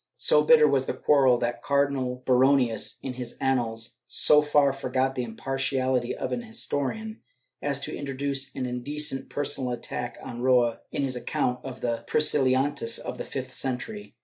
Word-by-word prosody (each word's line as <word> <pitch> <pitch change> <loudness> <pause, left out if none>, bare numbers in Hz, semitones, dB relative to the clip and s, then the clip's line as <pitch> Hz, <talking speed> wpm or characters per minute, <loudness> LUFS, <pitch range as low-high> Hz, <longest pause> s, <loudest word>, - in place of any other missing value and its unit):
So - - +4
bitter 470 -2 +7
was - - +1
the - - -2
quarrel 135 -4 +4
that 120 0 -2
Cardinal 135 -3 0
Baronius, 130 -2 +3
in 130 - -4
his 125 -1 -6
Annals, 115 -4 -1
so 150 0 +5
far 145 -2 +3
forgot 130 -1 -1
the 125 - -2
impartiality 130 +1 -1
of - - -4
an 240 - -2
historian 220 - -4 0.4
as - - -1
to - - -4
introduce 140 -1 -3
an 130 - -2
indecent 135 +3 -2
personal 145 -3 -2
attack 120 0 -5
on 120 -2 -7
Roa 125 -2 +3
in 140 - -1
his 130 -2 -2
account 125 0 -2
of 130 -1 -8
the 115 -1 -2
Priscil 150 -2 +3
lianists 130 -2 +1
of - - -6
the - - -2
fifth - - -6
century. 205 - -4
130 Hz, 165 wpm, -26 LUFS, 125-140 Hz, 0.4 s, bitter